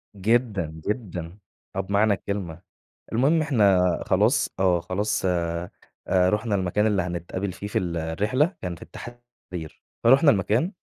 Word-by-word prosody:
جدًا، 100 -7 0
جدًا. 95 -6 -4 0.4
آه - - -1
بمعنى 100 +2 +2
الكلمة، 95 -4 -4 0.5
المهم 145 +8 +3
إحنا 105 -11 +4 0.3
خلاص - - +2
آه، 90 -2 +3
خلاص 95 +4 -1
آآ، 85 -1 -1 0.4
رُحنا 100 +4 +2
المكان 95 +2 +1
اللي 100 -3 +2
هنتقابل 90 +2 -4
فيه 100 +3 -7
في - - 0
الرحلة، 95 - 0
كان 90 -1 -4
في - - -17
التحرير، 120 -9 -10 0.2
فرُحنا 135 +5 +6
المكان، 110 - +1
100 Hz, 125 wpm, -25 LUFS, 90-110 Hz, 0.5 s, فرُحنا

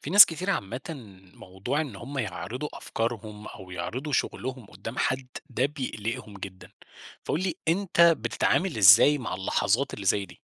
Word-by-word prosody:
في 145 - -6
ناس 205 +2 +11
كتيرة 180 +4 -2
عامةً، 110 - -4 0.5
موضوع 95 +10 -4
إن 150 -4 -5
هم 140 0 -7
يعرضوا 125 +5 -4
أفكارهم 110 -2 -4
أو 95 -1 -11
يعرضوا 115 - -5
شغلهم 130 -2 -2
قدّام 100 +7 -8
حد، 130 0 0 0.2
ده 130 - +1
بيقلقهم 115 -7 -5
جدًا. 95 -1 -10 0.5
فقل 160 - -1
لي، 185 -3 -1
أنت 180 +1 +1
بتتعامل 170 +1 +3
إزاي 110 +8 +7
مع 125 - -4
اللحظات 105 +7 0
اللي 100 - -7
زي 100 +1 +2
دي؟ - - -16
125 Hz, 155 wpm, -27 LUFS, 100-150 Hz, 0.5 s, ناس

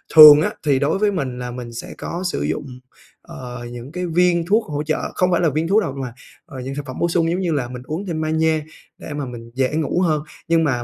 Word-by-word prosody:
thường 150 -1 +11
á - - 0
thì 140 -3 +2
đối 145 +6 +1
với 210 0 +3
mình 130 -9 -3
là 125 0 -5
mình 120 -1 -7
sẽ 115 - -7
có 175 +2 -5
sử - - -3
dụng, 75 - -2 0.6
ờ, 125 -1 -8
những 120 +3 -8
cái 180 +2 -3
viên 175 0 +2
thuốc 215 +4 +3
hỗ 150 0 -3
trợ 155 0 -2
không 180 0 +2
phải 175 - +2
là 165 - +3
viên 155 +3 -1
thuốc 210 +5 +4
đâu 140 - -3
mà, 125 -3 -5 0.3
ờ, 130 -2 -8
dạng 135 +2 -5
thực 145 -1 -5
phẩm 130 -2 -7
bổ 170 - +2
sung 165 -1 +1
giống 180 - -1
như 180 -3 -1
là 140 -5 -1
mình 125 0 -8
uống 160 +8 -4
thêm 165 -4 -3
magie 160 0 +1 0.4
để 150 - -8
mà 145 -1 -3
mình 115 -2 -9
dễ 130 +2 0
ngủ 160 +3 0
hơn. 155 -4 +1 0.2
Nhưng 165 0 +3
mà 125 -6 0
155 Hz, 260 wpm, -21 LUFS, 130-170 Hz, 0.6 s, thường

